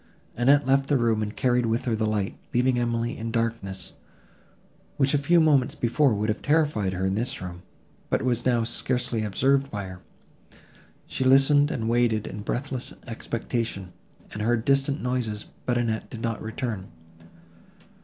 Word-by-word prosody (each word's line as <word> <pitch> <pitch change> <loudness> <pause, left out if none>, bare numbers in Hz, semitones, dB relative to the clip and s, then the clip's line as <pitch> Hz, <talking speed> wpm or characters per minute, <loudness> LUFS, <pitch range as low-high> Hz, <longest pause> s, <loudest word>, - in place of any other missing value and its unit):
Annette 140 +4 +4
left 135 +1 +2
the 145 - +4
room, 115 -3 +1
and 105 0 -3
carried 125 -2 +2
with 115 +2 0
her 120 -3 +1
the 110 0 0
light, 105 -2 -1 0.2
leaving 125 0 +3
Emily 120 0 -1
in 115 0 -4
darkness, 115 -4 -3 1.0
which 135 0 +2
a 145 - +3
few 170 +5 +4
moments 145 -5 +3
before 125 +1 +2
would 105 +1 -1
have 110 0 -1
terrified 145 -11 +1
her 95 +1 -2
in 95 - +1
this 120 +6 -2
room, 85 -1 -7 0.5
but - - +1
was 120 -2 +1
now 120 -2 +2
scarcely 120 -1 -1
observed 135 +7 +2
by 100 -4 -4
her. 95 -1 -9 1.1
She - - -3
listened 135 +2 +5
and 110 -5 -2
waited, 115 -2 +2
in 105 - -6
breathless 130 +4 -4
expectation, 115 -4 -4 0.4
and 105 - -5
heard 115 +1 +1
distant 140 0 +2
noises, 120 -4 -2 0.2
but 125 -1 +2
Annette 115 -2 -1
did 115 - -8
not 115 -1 -2
return. 110 -3 -4
120 Hz, 165 wpm, -26 LUFS, 110-130 Hz, 1.1 s, listened